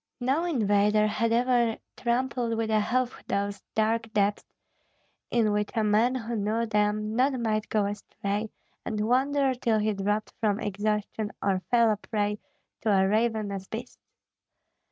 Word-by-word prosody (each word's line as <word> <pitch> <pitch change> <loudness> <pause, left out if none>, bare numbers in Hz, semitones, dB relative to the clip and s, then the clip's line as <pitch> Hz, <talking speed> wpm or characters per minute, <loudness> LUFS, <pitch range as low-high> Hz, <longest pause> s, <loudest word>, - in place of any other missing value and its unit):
No 270 +7 +1
invader 210 - +3
had 225 +2 0
ever 240 -1 +2 0.2
trampled 240 -1 -1
with 225 -1 -1
a 215 -1 +3
hoof 250 +3 -1
those 200 0 -2
dark 225 +1 +1
depths 205 0 +1 0.9
in 225 -3 +2
which 210 0 0
a 220 - +2
man 220 +4 +3
who 235 -1 -3
knew 220 +2 0
them 210 0 0
not 260 +1 +2
might 215 -2 -1
go 210 -2 +1
astray 205 +1 -3 0.3
and 215 -2 -3
wander 270 +2 +2
till 235 -3 +1
he 215 0 +1
dropped 205 +2 -1
from 210 -2 +1
exhaustion 210 0 -2
or 190 -2 0
fell 235 -2 +4
a 210 - 0
prey 210 -1 -2 0.4
to 220 - 0
ravenous 200 0 +1
beasts. 225 +2 -7
215 Hz, 145 wpm, -27 LUFS, 210-235 Hz, 0.9 s, fell